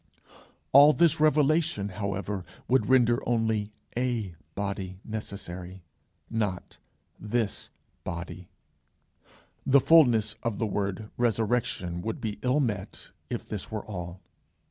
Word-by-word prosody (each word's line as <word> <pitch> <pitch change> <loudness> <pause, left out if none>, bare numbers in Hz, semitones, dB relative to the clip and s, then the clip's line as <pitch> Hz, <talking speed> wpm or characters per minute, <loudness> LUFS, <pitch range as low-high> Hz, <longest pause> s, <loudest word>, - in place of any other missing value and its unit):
All 145 +3 +9
this 165 +2 +3
revelation, 155 -6 +3
however, 100 -1 -3 0.2
would 130 +1 +3
render 120 -2 +4
only 110 -3 +1 0.2
a 120 -6 -1 0.2
body 95 -2 -4
necessary, 95 -4 -6 0.4
not 105 -5 -3 0.4
this 110 0 -2 0.3
body. 85 +1 -6 1.1
The 140 +1 +5
fulness 125 -7 +5
of 115 -4 -2
the 115 - 0
word 100 0 -3
Resurrection 110 -7 0
would 110 +4 -3
be 105 -2 -4
ill 130 +3 +2
met 105 -7 -3 0.2
if - - -4
this 105 -4 -5
were 110 -1 -4
all. 90 -3 -6
110 Hz, 110 wpm, -28 LUFS, 100-125 Hz, 1.1 s, All